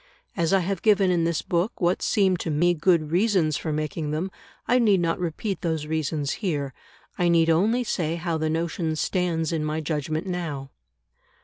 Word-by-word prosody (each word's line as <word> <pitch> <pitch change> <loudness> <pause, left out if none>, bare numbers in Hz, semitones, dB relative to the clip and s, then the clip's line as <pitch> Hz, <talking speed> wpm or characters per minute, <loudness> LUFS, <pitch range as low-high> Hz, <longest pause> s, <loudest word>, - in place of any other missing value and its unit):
As 170 -3 0
I 195 -1 +4
have 185 0 -2
given 200 -4 +4
in 170 -2 +2
this 165 -2 -1
book 180 +2 -1
what 175 0 +1
seemed 190 -4 +2
to 165 - -3
me 170 +4 +3
good 165 -2 +2
reasons 180 -5 +2
for 155 - -3
making 155 0 -2
them, 160 +6 -2 0.4
I 250 +2 +4
need 210 -5 +4
not 165 0 0
repeat 180 +3 -3
those 160 -3 -1
reasons 155 -2 -1
here; 145 - -2 0.5
I 175 -1 +3
need 165 -1 +4
only 215 +10 +2
say 165 -8 -1
how 170 -1 -2
the 155 0 0
notion 165 0 -1
stands 165 -1 0
in 160 -2 -1
my 155 +1 -1
judgment 155 +1 -2
now. 160 -7 -4
165 Hz, 185 wpm, -25 LUFS, 155-185 Hz, 0.5 s, I